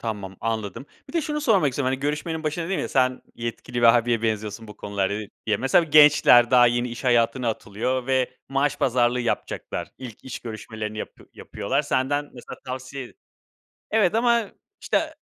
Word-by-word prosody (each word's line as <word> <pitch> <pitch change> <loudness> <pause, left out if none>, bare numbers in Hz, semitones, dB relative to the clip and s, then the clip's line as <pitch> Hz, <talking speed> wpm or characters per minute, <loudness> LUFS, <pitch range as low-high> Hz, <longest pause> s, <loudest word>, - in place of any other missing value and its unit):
Tamam, 100 -4 -5
anladım. 110 +2 -3 0.2
Bir - - -11
de 335 - +1
şunu 300 +1 -2
sormak 210 - +3
istiyorum, 130 +1 -2
hani, 130 - -3
görüşmenin 150 +3 -2
başında 155 +2 -2
dedim 190 - -1
ya, - - -3
"Sen 130 -1 +1
yetkili 120 +1 -5
bir - - -1
abiye 120 -1 0
benziyorsun 110 -1 -3
bu 105 - -11
konularda" 100 -1 -2
diye. 105 -1 -5 0.2
Ya, 110 - +1
mesela 135 +6 +3
b - - -15
gençler 145 -5 +7
daha 125 -1 +7
yeni 120 +1 +1
iş 120 +3 -8
hayatına 120 0 +2
atılıyor 120 +4 -2
ve 130 -1 +1 0.2
maaş 135 +1 0
pazarlığı 125 0 +2
yapacaklar. 120 - -3
İlk 125 -5 -10
iş 130 - -6
görüşmelerini 110 -1 -6
yapı - - -8
yapıyorlar. - - -2
Senden 145 +3 0
mesela 120 - -10
tavsiye 130 0 -6 0.8
Evet, 210 -4 +3
ama 235 -2 +2 0.3
işte - - -1
125 Hz, 175 wpm, -24 LUFS, 115-145 Hz, 0.8 s, gençler